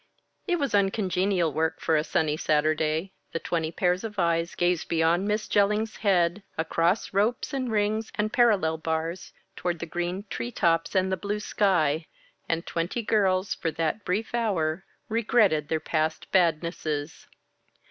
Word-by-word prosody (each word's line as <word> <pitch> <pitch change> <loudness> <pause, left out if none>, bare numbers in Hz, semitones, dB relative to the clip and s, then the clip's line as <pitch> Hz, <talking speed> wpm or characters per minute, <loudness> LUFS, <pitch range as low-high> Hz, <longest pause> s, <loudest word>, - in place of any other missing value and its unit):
It 355 -2 +2
was 280 -7 -1
uncongenial 195 -4 +1
work 160 +1 0
for 160 - +1
a 150 - +2
sunny 155 -1 0
Saturday. 155 +3 0 0.2
The 165 - -1
twenty 165 -2 -2
pairs 180 +2 0
of 215 -2 -6
eyes 170 -1 +1
gazed 175 -1 +1
beyond 170 +3 +2
Miss 210 +1 -1
Jellings' 210 +2 +1
head 180 -2 +2 0.2
across 165 +6 0
ropes 215 +8 0
and 255 -3 -2
rings 215 +1 0
and 215 +1 -1
parallel 195 -10 +3
bars 160 +2 -3 0.2
toward 175 -1 -2
the 170 - -5
green 175 +3 -3
tree 240 - -4
tops 165 -3 +1
and 190 0 +2
the 190 - 0
blue 205 +4 -3
sky; 165 -7 +1 0.4
and 165 +1 -1
twenty 175 +8 -2
girls, 195 -3 +2
for 165 - -2
that 165 +6 -1
brief 210 +6 -2
hour, 190 -7 0 0.2
regretted 215 -9 +2
their 160 - 0
past 155 0 -2
badnesses. 160 -4 0
180 Hz, 150 wpm, -26 LUFS, 160-205 Hz, 0.4 s, parallel